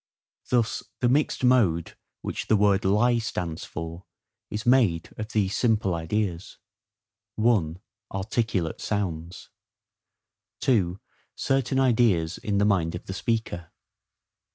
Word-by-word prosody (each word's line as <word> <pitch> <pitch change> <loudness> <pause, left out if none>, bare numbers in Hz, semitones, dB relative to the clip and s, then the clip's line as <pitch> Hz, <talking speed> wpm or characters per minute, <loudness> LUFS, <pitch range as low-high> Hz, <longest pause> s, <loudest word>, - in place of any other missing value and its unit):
Thus, 120 -2 +1 0.2
the 125 - +2
mixed 140 +2 +1
mode 105 -10 +3 0.3
which - - -4
the 110 - +4
word 100 -1 +3
LIE 115 +5 +3
stands 90 -7 -4
for 85 +2 -7 0.4
is 105 +1 -4
made 115 -10 +3
of 110 - -5
these 105 -4 0
simple 110 -6 +2
ideas:—(1) 90 +1 -3 0.3
Articulate 95 -3 -1
sounds. 90 -4 -3 1.1
(2) 95 -8 +2 0.4
Certain 135 0 +1
ideas 110 -10 +2
in 100 -1 -1
the 100 - +3
mind 85 -5 +1
of 85 - -8
the 95 - -5
speaker. 100 -4 -2
100 Hz, 110 wpm, -26 LUFS, 85-115 Hz, 1.1 s, the